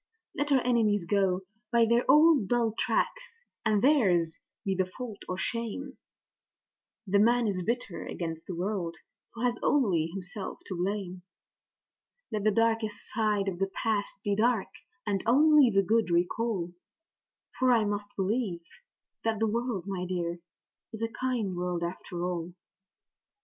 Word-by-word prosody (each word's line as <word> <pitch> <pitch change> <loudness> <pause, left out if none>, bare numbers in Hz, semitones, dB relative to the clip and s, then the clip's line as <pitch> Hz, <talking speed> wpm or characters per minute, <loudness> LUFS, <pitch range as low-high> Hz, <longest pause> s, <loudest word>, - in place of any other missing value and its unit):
Let 290 0 -2
our 265 -2 +5
enemies 220 -6 +2
go 190 0 +1 0.3
by 235 -1 +5
their 235 +2 +2
old 300 - +6
dull 235 -1 +1
tracks, - - -2 0.2
and 215 -1 +2
theirs 185 - +3 0.3
be 195 - +1
the 185 -1 0
fault 220 +1 -7
or 185 - -2
shame 235 +6 -4 1.1
(The 200 0 +2
man 235 +2 +4
is 190 -3 -1
bitter 230 -2 -3
against 165 -2 -5
the 180 - -4
world 180 -2 -2 0.4
who 230 - -5
has 240 -1 +1
only 190 - +2
himself 190 +3 -6
to 185 - -5
blame); 185 0 -3 1.1
Let 210 -2 -2
the - - +6
darkest 225 -1 0
side 210 -3 +1
of 180 -2 -3
the 195 - +1
past 215 -3 -1
be 205 -1 +1
dark, 225 -1 +2 0.4
and 200 -2 0
only 295 +2 +6
the 195 -2 +3
good 220 +1 +2
recall; 175 +1 0 0.9
For 255 -1 +4
I 230 -3 +4
must 205 0 -2
believe 195 -3 -1 0.6
that 225 -1 0
the 225 - +1
world, 230 -3 -1
my 185 -2 -3
dear, 175 -1 -2 0.5
is 220 0 -5
a 225 - 0
kind 230 -6 -2
world 175 -1 -2
after 175 0 -4
all. 175 -1 -4
205 Hz, 150 wpm, -29 LUFS, 185-235 Hz, 1.1 s, old